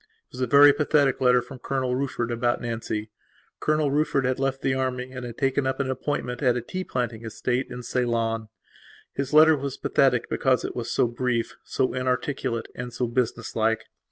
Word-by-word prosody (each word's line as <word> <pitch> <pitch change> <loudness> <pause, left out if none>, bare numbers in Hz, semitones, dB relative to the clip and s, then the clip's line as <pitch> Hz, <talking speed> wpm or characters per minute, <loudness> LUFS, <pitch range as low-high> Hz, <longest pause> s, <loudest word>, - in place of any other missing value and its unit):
It - - -45
was 130 - -6
a 125 - +1
very 145 +3 +8
pathetic 145 -3 +2
letter 125 -1 +4
from 130 +1 -11
Colonel 130 -1 -1
Rufford 130 -3 -2
about 120 +1 0
Nancy. 110 -2 -4 0.5
Colonel 155 -2 +1
Rufford 145 -2 +1
had 130 0 0
left 135 0 -1
the 135 - +2
army 130 -1 -2
and 130 -1 -7
had 120 -1 -7
taken 135 0 +1
up 130 - -2
an 135 -1 0
appointment 130 -1 -3
at 125 -3 +3
a - - -2
tea 185 +9 -4
planting 120 -7 -3
estate 125 +3 -2
in 125 0 -7
Ceylon. 115 -2 -1 0.6
His 140 -1 -3
letter 155 +1 +7
was 140 -2 -4
pathetic - - +2
because - - +1
it - - -5
was - - -4
so - - +3
brief, 120 0 -2
so 130 - -1
inarticulate, 125 -1 -1
and 120 0 -6
so 120 +1 -1
business 120 0 -2
like. 115 0 +1
125 Hz, 190 wpm, -25 LUFS, 120-135 Hz, 0.6 s, very